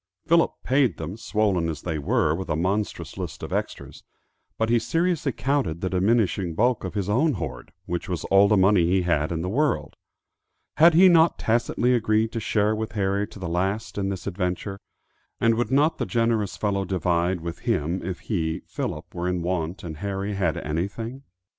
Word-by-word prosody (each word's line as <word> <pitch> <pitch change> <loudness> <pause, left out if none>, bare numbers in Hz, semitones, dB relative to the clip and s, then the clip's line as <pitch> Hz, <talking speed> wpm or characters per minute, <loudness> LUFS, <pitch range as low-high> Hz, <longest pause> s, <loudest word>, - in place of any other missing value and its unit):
Philip 165 0 +3
paid 130 -1 +2
them, 95 - -5
swollen 105 -6 0
as 80 - -5
they 80 -3 -2
were 75 +1 +1
with 95 +3 -5
a - - +1
monstrous 95 +6 -2
list - - -6
of - - -5
extras; - - -4 0.6
but 110 0 0
he 120 - +4
seriously 165 +2 0
counted 120 - -1
the 95 - -2
diminishing 95 -3 +1
bulk 120 +4 +2
of 95 +2 -5
his 100 -3 -1
own 135 +9 +2
hoard, 70 - -6
which 85 +1 -4
was 90 -2 -2
all 100 +1 +6
the 105 0 +3
money 95 -2 +4
he 90 +1 +2
had 80 -3 +1
in 80 -1 -2
the - - -2
world. 145 +9 0 0.8
Had 165 +2 +7
he 185 +3 +8
not 170 -2 +5
tacitly 120 +2 +1
agreed 110 -1 +2
to 115 - -3
share 105 0 +1
with 110 0 -4
Harry 100 0 0
to 105 - -13
the 95 -3 -5
last 95 +6 -2
in 100 -1 -1
this 95 -3 -5
adventure, 95 +1 -3 0.6
and 115 0 +4
would 120 +2 -1
not 145 +5 +2
the - - -1
generous 115 -4 0
fellow 100 -2 0
divide 90 -1 0
with 85 0 -6
him 80 +5 -1
if 90 0 -5
he, 80 -7 -2
Philip, - - -5
were 90 +1 -3
in 90 -1 -1
want 90 0 -2
and 80 -3 -6
Harry 100 +2 -3
had 90 -6 0
anything? 100 - -4
100 Hz, 190 wpm, -25 LUFS, 90-115 Hz, 0.8 s, he